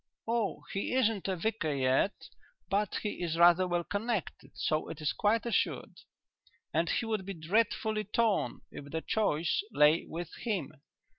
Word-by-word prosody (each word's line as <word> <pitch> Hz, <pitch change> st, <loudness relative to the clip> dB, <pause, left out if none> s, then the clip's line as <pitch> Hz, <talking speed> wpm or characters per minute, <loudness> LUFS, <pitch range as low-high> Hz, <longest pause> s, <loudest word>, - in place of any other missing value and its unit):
"Oh, 230 Hz, -3 st, -1 dB
he 195 Hz, +5 st, -1 dB
isn't 225 Hz, -7 st, +1 dB
a 190 Hz, -, 0 dB
vicar 180 Hz, -3 st, -1 dB
yet, 135 Hz, +6 st, +1 dB, 0.4 s
but 205 Hz, 0 st, +1 dB
he 210 Hz, -, -3 dB
is 165 Hz, -2 st, -1 dB
rather 175 Hz, +2 st, +6 dB
well 175 Hz, -1 st, 0 dB
connected, 210 Hz, +1 st, -3 dB
so 155 Hz, 0 st, -1 dB
it 155 Hz, -, -7 dB
is 155 Hz, -1 st, 0 dB
quite 220 Hz, +2 st, +1 dB
assured. 235 Hz, -4 st, -1 dB, 0.7 s
And 165 Hz, +2 st, +1 dB
he -, -, 0 dB
would 215 Hz, -3 st, -1 dB
be 195 Hz, +1 st, -6 dB
dreadfully 215 Hz, +5 st, 0 dB
torn 215 Hz, 0 st, +1 dB
if 140 Hz, -, -8 dB
the 160 Hz, +2 st, -3 dB
choice 175 Hz, -, +1 dB
lay 150 Hz, +3 st, +4 dB
with 170 Hz, 0 st, -6 dB
him. 200 Hz, -, -2 dB
190 Hz, 155 wpm, -31 LUFS, 165-220 Hz, 0.7 s, rather